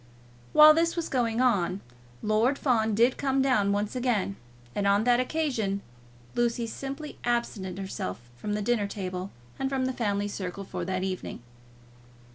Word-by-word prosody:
While 305 0 +9
this 335 +1 +2
was 335 -2 -2
going 235 -2 +1
on, 195 -7 +2 0.4
Lord 220 +6 +2
Fawn 220 -5 +2
did 240 +4 +4
come 270 -1 +1
down 255 -7 +3
once 205 +3 -1
again, 240 -6 0 0.4
and 200 -1 0
on 200 +1 +4
that 245 0 +4
occasion 250 -9 -1 0.5
Lucy 235 0 +1
simply 275 +5 -6
absented 220 -6 -1
herself 155 - -4 0.2
from 205 +12 -4
the 210 0 -1
dinner 215 -2 +1
table 185 -2 -4 0.3
and 270 - 0
from 265 -1 0
the 260 - -1
family 205 -4 0
circle 195 -1 -5
for 180 -2 -5
that 185 0 -1
evening. 185 -9 -4
220 Hz, 155 wpm, -28 LUFS, 200-255 Hz, 0.5 s, While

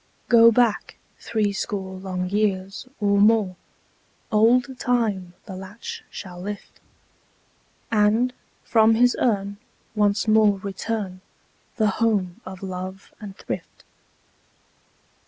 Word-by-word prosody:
Go 230 -1 +8
back 235 -2 +1 0.2
threescore 200 -3 -2
long 185 -1 -3
years, 195 +2 -1
or 200 -1 +2
more: 210 -3 +4 0.8
Old 240 +4 +3
Time 210 -8 0
the 190 - -8
latch 190 +4 -8
shall 180 -2 -8
lift, 205 +1 -7 1.1
And, 220 +3 +3 0.3
from 225 -1 +4
his 245 +2 +4
urn, 200 -4 0 0.4
once 210 0 +1
more 215 -2 +4
return 195 -1 -4 0.5
The 220 -3 +2
home 200 -6 +1
of 185 0 -9
love 185 +1 -7
and 200 -2 -9
thrift. - - -7
205 Hz, 100 wpm, -23 LUFS, 190-225 Hz, 1.1 s, Go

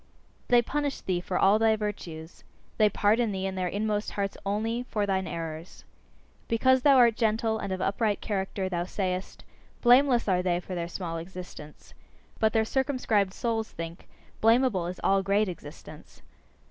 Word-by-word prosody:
They 240 -1 +5
punish 285 +2 -2
thee 180 -2 -1
for 180 0 -2
all 200 +3 +4
thy 220 -1 +4
virtues. 175 -6 -6 0.4
They 215 -1 +5
pardon 215 +3 +2
thee 190 -1 -3
in 190 - -2
their 185 -1 -2
inmost 210 +2 -1
hearts 200 -1 -2
only 225 +4 -1
for 210 -2 0
thine 190 -2 -1
errors. 165 +1 -7 0.6
Because 260 +3 +3
thou 275 0 +6
art 235 -3 +5
gentle 220 -1 0
and 200 - -4
of 185 0 -3
upright 205 +2 0
character, 195 -1 -3
thou 175 -2 -2
sayest: 185 -1 -4 0.4
"Blameless 245 0 +5
are 185 -2 +2
they 175 -1 0
for 180 +1 -8
their 170 -1 -3
small 170 -1 -5
existence." 170 -3 -10 0.5
But 220 -1 +3
their 220 0 +2
circumscribed 225 -7 0
souls 225 -2 -2
think: 165 +1 -8 0.3
"Blamable 225 -5 +3
is 180 - -7
all 195 0 +3
great 200 +2 +1
existence." 155 -3 -11
200 Hz, 160 wpm, -27 LUFS, 180-225 Hz, 0.6 s, thou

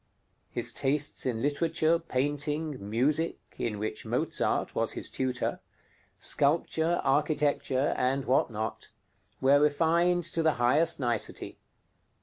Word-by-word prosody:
His - - -3
tastes 145 0 0
in 115 -2 -2
literature, 160 +3 +1
painting, 145 - -2
music 145 +9 +1 0.2
(in 110 -3 -2
which 110 +1 -4
Mozart - - -1
was - - -1
his - - -3
tutor), 130 -1 -2 0.6
sculpture, 160 +3 +1
architecture, 145 -1 +1
and 135 +2 0
what 130 0 +2
not, 110 -1 -5 0.5
were 140 +2 +5
refined 170 +4 +2
to 165 0 -1
the 160 -1 +3
highest 145 +8 +2
nicety. 120 -5 -3
145 Hz, 115 wpm, -29 LUFS, 130-160 Hz, 0.6 s, were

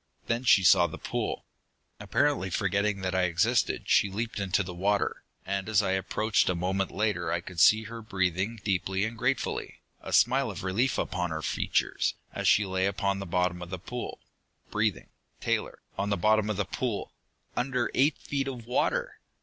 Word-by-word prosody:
Then 120 +2 -1
she 100 -5 +6
saw 90 -1 +6
the 80 - -8
pool. - - -3 0.5
"Apparently 145 -10 +1
forgetting 100 +1 0
that 95 -1 -2
I 95 -1 +2
existed, 85 -1 +1
she 100 - +4
leaped 110 +3 -3
into 100 +1 +1
the 90 -1 -7
water, 100 +3 0 0.2
and 100 +2 -2
as 105 -1 +3
I 95 - 0
approached 105 +3 +1
a 90 - +1
moment 95 +2 -1
later 95 -6 -1
I 85 - +1
could 90 0 -8
see 110 +6 +6
her 115 +1 -8
breathing 95 +1 -1
deeply 95 0 0
and 115 +1 -4
gratefully, - - -2 0.2
a - - -7
smile 130 +1 +4
of 100 -2 -6
relief 110 +8 +1
upon 90 -1 -1
her 80 -1 -4
features, - - 0 0.2
as - - -2
she 105 - +5
lay 95 0 0
upon 100 0 -1
the 100 - -6
bottom 90 0 0
of 90 - -7
the 95 - -4
pool. 120 +7 -6 0.5
Breathing, 105 -3 -1 0.3
Taylor, - - -1 0.2
on 100 +1 0
the 100 - +1
bottom 110 +3 +3
of 105 - -1
the 100 - 0
pool! 110 +4 -3 0.4
Under 125 -1 0
eight 140 +3 +3
feet 135 -1 -3
of 125 -4 -6
water!" - - 0
100 Hz, 180 wpm, -28 LUFS, 95-110 Hz, 0.5 s, she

